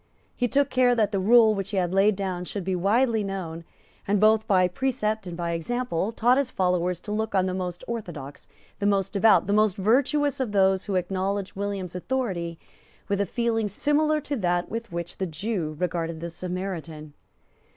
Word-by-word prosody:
He 245 - 0
took 280 +2 +1
care 250 -1 +4
that 215 -3 +1
the 200 - 0
rule 220 +2 +6
which 195 -1 -3
he 205 - -3
had 180 -1 0
laid 195 +2 +4
down 185 -2 -3
should 200 +1 -4
be 185 +1 -1
widely 220 +5 +2
known, 180 -4 -5 0.4
and, 200 0 +2
both 220 +1 +4
by 185 -4 +4
precept 220 -1 -2
and 170 -1 -6
by 170 -1 -2
example, 205 +2 -2
taught 245 +3 +3
his 275 -3 0
followers 180 -3 0
to 210 - -7
look 215 0 -2
on 185 -1 +3
the 185 - -2
most 180 -2 -4
orthodox, 170 -12 -6 0.3
the 205 - +1
most 195 -1 +1
devout, 200 -3 +5
the 200 - 0
most 210 -1 +3
virtuous 270 +8 +2
of 245 -6 -2
those 190 -1 +3
who 200 - -2
acknowledged 190 +2 -2
William's 195 -3 -4
authority 180 -5 -3 0.5
with 200 0 +1
a 200 - -1
feeling 230 0 0
similar 300 +8 +1
to 285 - -3
that 175 -3 0
with 230 -1 -5
which 170 0 -5
the 190 - -2
Jew 165 -1 -3
regarded 170 -2 -2
the 170 +1 -5
Samaritan. 170 -4 -5
195 Hz, 190 wpm, -25 LUFS, 180-225 Hz, 0.5 s, rule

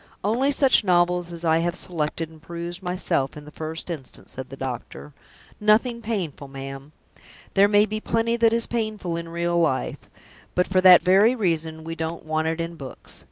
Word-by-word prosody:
"Only 235 +7 +2
such 270 -4 +4
novels 175 -1 +2
as 170 0 -6
I 160 0 +4
have 170 +1 -1
selected 165 -2 -2
and 160 -1 -17
perused 170 +2 -6
myself, 180 -7 -1
in 150 - -10
the 150 - -11
first 160 +1 -5
instance," 155 -7 -8
said 130 0 -7
the 135 - -9
doctor. 135 +3 -6 0.5
"Nothing 230 +3 +3
painful, 185 -11 -3
ma'am! 135 +1 -8 0.6
There 200 +1 +6
may 205 0 +5
be 215 0 -4
plenty 230 +1 0
that 230 -1 +4
is 230 0 +1
painful 215 -7 -3
in 170 0 -5
real 170 +1 0
life; 155 -6 0 0.6
but 180 - +3
for 185 -1 +2
that 185 -1 +8
very 200 +7 +5
reason, 165 -6 -1
we 165 +1 -5
don't 165 0 -5
want 155 0 0
it 165 +1 -1
in 165 0 -4
books. 135 -3 -6
170 Hz, 185 wpm, -24 LUFS, 160-205 Hz, 0.6 s, that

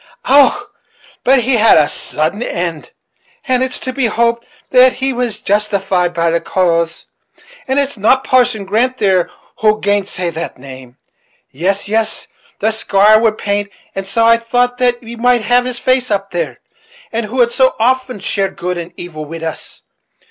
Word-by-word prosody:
Och! 285 +9 +4 0.5
but 265 0 +4
he 250 +1 +2
had 225 -4 +5
a 150 -2 +4
sudden 160 +10 -2
end! 170 -8 -4 0.6
but 255 -1 +2
it's 260 0 -1
to 255 - -4
be 260 -2 0
hoped 235 +1 0 0.2
that 255 0 +6
he 265 +1 -2
was 240 -3 -2
justified 195 -4 0
by 170 -1 0
the 170 - 0
cause, 170 -2 0 0.6
And 265 +1 0
it's 280 -5 -1
not 260 +6 +3
Parson 245 -5 +2
Grant 240 +6 0
there 190 -6 +1 0.3
who'll 215 -1 +3
gainsay 200 -4 -1
that 165 +1 -6
same. 130 -1 -12 0.5
Yes, 195 +8 -1
yes; 220 +1 -1 0.3
the 220 +2 0
squire 215 0 +4
would 220 -1 +1
paint, 205 0 -2 0.2
and 195 0 -5
so 225 +4 +1
I 230 0 +6
thought 245 +2 -1
that 245 -1 +2
we 230 +1 -8
might 245 0 +2
have 245 +3 +2
his 250 -1 -3
face 255 +1 +1
up 195 -1 -2
there, 160 -8 -4 0.5
who 230 +2 -3
had 235 -1 +4
so 260 +1 +2
often 255 0 0
shared 195 0 -2
good 180 0 -3
and 170 +1 -8
evil 155 -3 -7
wid 165 +2 -8
us. 160 -1 -6
215 Hz, 170 wpm, -15 LUFS, 180-245 Hz, 0.6 s, that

